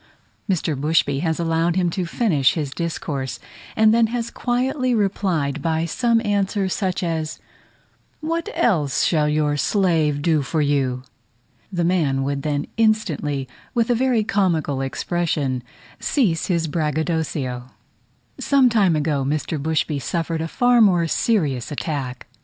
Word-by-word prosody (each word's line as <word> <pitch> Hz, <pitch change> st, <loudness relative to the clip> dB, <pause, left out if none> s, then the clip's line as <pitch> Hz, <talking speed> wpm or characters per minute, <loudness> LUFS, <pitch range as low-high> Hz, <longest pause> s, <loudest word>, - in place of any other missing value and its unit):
Mr. 165 Hz, -4 st, 0 dB
Bushby 145 Hz, -1 st, +1 dB
has 160 Hz, +1 st, -1 dB
allowed 165 Hz, 0 st, +1 dB
him 180 Hz, -2 st, +1 dB
to 180 Hz, 0 st, -2 dB
finish 165 Hz, -, +2 dB
his 150 Hz, -5 st, -2 dB
discourse, 145 Hz, -5 st, -3 dB, 0.4 s
and 220 Hz, 0 st, +5 dB
then 230 Hz, -1 st, +4 dB
has 235 Hz, 0 st, -3 dB
quietly 255 Hz, +1 st, 0 dB
replied 180 Hz, -9 st, 0 dB
by 160 Hz, +1 st, 0 dB
some 230 Hz, +7 st, +1 dB
answer 200 Hz, -1 st, 0 dB
such 185 Hz, -1 st, -2 dB
as, 160 Hz, -2 st, -2 dB, 0.8 s
"What 330 Hz, +2 st, -2 dB
else 175 Hz, -, +2 dB
shall 150 Hz, -3 st, +2 dB
your 150 Hz, -1 st, +1 dB
slave 160 Hz, -6 st, +1 dB
do 160 Hz, -2 st, +2 dB
for 155 Hz, +3 st, -2 dB
you?" 135 Hz, -4 st, 0 dB, 0.7 s
The 175 Hz, -2 st, -1 dB
man 155 Hz, -7 st, +1 dB
would 140 Hz, 0 st, -2 dB
then 145 Hz, 0 st, -1 dB
instantly, 165 Hz, -11 st, 0 dB, 0.3 s
with 235 Hz, 0 st, +2 dB
a -, -, +5 dB
very 245 Hz, -2 st, +2 dB
comical 170 Hz, -9 st, 0 dB
expression, 140 Hz, -2 st, -1 dB, 0.4 s
cease 195 Hz, -, +1 dB
his 170 Hz, -3 st, +1 dB
braggadocio. 150 Hz, -5 st, -2 dB, 0.7 s
Some 275 Hz, -3 st, +4 dB
time 200 Hz, -7 st, +3 dB
ago, 145 Hz, -2 st, 0 dB
Mr. 150 Hz, +2 st, -2 dB
Bushby 155 Hz, -1 st, 0 dB
suffered 165 Hz, +2 st, -2 dB
a 165 Hz, -, -2 dB
far 245 Hz, +6 st, +3 dB
more 180 Hz, -5 st, +4 dB
serious 155 Hz, -, 0 dB
attack. 140 Hz, -4 st, -4 dB
165 Hz, 135 wpm, -22 LUFS, 145-200 Hz, 0.8 s, and